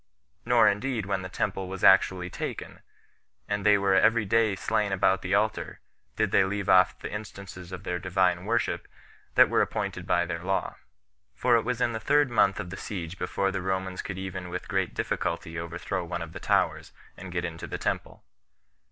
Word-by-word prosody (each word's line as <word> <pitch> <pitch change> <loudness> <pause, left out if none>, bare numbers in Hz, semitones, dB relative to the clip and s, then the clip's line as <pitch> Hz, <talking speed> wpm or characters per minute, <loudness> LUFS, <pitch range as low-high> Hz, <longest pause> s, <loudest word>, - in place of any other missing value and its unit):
Nor - - +5
indeed 110 +1 0
when 100 -1 -1
the 95 - -6
temple 95 0 -2
was 95 0 -7
actually 95 -1 +5
taken, - - -6 0.7
and 100 -1 -2
they 105 0 +6
were 100 -1 +2
every 110 +3 +4
day 110 0 +2
slain 100 +1 0
about 95 0 +2
the - - 0
altar, - - -1 0.4
did 110 -3 0
they 95 - +5
leave 100 0 -2
off 95 0 +5
the - - -7
instances 100 -3 -8
of 95 - -7
their 90 0 -2
Divine 90 -1 +1
worship 115 +2 -1 0.5
that - - +8
were - - +2
appointed - - -3
by - - +2
their 85 - -4
law; 95 +1 -1 0.6
for 120 - +3
it 115 - +4
was 125 +1 -2
in 120 - +1
the 110 - -3
third 145 +4 +2
month 100 -4 +3
of 90 - -5
the 95 - -6
siege 90 -3 -6
before 95 0 -1
the 95 -1 -3
Romans 95 0 -2
could 95 - -6
even 95 -1 -5
with 90 +1 -5
great 95 -2 -1
difficulty 80 0 -2
overthrow 90 +2 -4
one 85 0 -4
of 80 0 -10
the - - -7
towers, - - 0 0.2
and 90 0 -9
get 85 0 -2
into 80 -1 -6
the - - -4
temple. - - -3
95 Hz, 195 wpm, -27 LUFS, 90-105 Hz, 0.7 s, that